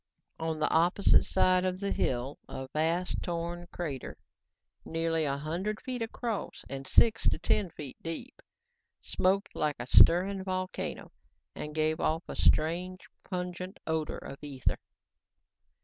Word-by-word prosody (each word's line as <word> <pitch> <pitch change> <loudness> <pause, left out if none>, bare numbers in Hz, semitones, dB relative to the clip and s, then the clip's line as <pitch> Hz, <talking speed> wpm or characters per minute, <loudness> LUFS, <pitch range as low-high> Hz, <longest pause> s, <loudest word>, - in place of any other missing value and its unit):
On 160 -1 -1
the 155 - +1
opposite 175 +5 +4
side 185 -1 +3
of 185 0 -1
the 200 0 -1
hill, 125 +3 -1
a 130 - -5
vast, 165 +4 0
torn 175 0 -3
crater, 145 -7 -5 0.7
nearly 165 -1 0
a 140 -1 0
hundred 175 +9 -2
feet 255 -2 -4
across 225 -1 -4
and 135 0 -6
six 225 -1 +5
to - - -1
ten 205 -4 +1
feet 145 -5 -8
deep, 235 - -6 0.6
smoked 195 +2 0
like 150 -1 0
a 120 - -4
stirring 190 +8 +6
volcano 185 0 -3 0.4
and 150 0 -6
gave 155 +1 +1
off 160 +2 0
a - - -6
strange, 180 +4 +1 0.2
pungent 180 0 -5
odor 160 -1 -1
of 135 - -9
ether. 140 -3 -2
170 Hz, 135 wpm, -30 LUFS, 155-185 Hz, 0.7 s, stirring